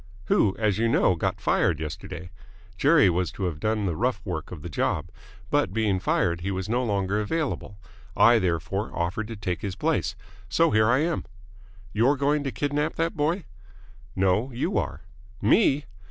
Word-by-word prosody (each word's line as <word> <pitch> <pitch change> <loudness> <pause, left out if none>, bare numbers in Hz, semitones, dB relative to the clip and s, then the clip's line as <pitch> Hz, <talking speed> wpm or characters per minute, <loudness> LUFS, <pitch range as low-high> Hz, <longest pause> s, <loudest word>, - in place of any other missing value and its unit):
"Who, 95 0 +3
as 105 -2 +1
you 115 - +2
know, 95 - +4
got 80 - -2
fired 80 - +1
yesterday. 80 +2 -6 0.4
Jerry 145 - +5
was 90 0 0
to 100 - -5
have 85 -5 -2
done 110 +2 0
the 85 -4 -1
rough 120 +1 0
work 85 -5 -4
of 80 -5 -8
the - - -5
job. 75 - -1 0.4
But, 95 - +1
being 105 -4 +1
fired, 85 -2 0
he 95 - -2
was 95 -1 -3
no 120 +3 0
longer 100 -2 0
available. 125 -5 -3 0.4
I, 120 -1 +6
therefore, 95 +3 -1
offered 90 +6 -2
to 115 - -6
take 90 -4 -3
his 95 -2 -4
place. 150 - 0 0.3
So 165 +10 +3
here 110 +1 +4
I 125 +4 +4
am." 170 0 -1 0.7
"You're 125 +7 +3
going 145 +2 +1
to 135 - -1
kidnap 145 +2 -1
that 165 0 -1
boy?" 165 +5 0 0.7
"No. 95 +7 +1
You 120 - -2
are." 75 - -4 0.4
"Me!" 140 - +3
105 Hz, 175 wpm, -26 LUFS, 90-135 Hz, 0.7 s, I